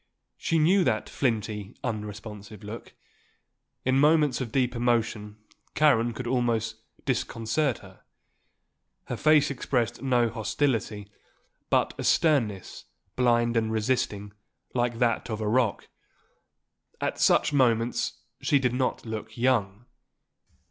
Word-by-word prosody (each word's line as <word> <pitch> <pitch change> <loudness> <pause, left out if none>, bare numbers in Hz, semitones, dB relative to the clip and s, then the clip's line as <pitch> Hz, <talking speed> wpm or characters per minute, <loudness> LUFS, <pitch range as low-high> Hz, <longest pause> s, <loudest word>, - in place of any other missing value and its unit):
She 165 - -1
knew 180 +5 +4
that 110 - 0
flinty, 110 -4 -2
unresponsive 105 -2 -6
look. 110 +3 -8 0.9
In 130 +1 +3
moments 150 -2 +3
of 120 -4 -4
deep 125 -1 +1
emotion 115 -3 -1 0.4
Karen 120 -6 +4
could 125 +3 -6
almost 115 -3 0 0.3
disconcert 120 +1 0
her. 95 -1 -16 1.0
Her - - -5
face 155 -2 +4
expressed 125 -3 -1
no 125 -3 +2
hostility; 110 -2 -1 0.6
but - - +2
a - - -2
sternness, 120 - +1 0.3
blind 120 -1 +2
and 110 -1 +1
resisting, 105 -3 -1 0.4
like 120 -1 0
that 120 -1 0
of 110 -1 -3
a 110 - -2
rock. 115 -1 +1 1.1
At - - -2
such - - +3
moments 120 -3 +1 0.2
she 145 - +3
did 125 -3 0
not 130 -1 -1
look 110 0 -6
young. 115 -4 0
120 Hz, 115 wpm, -27 LUFS, 110-130 Hz, 1.1 s, knew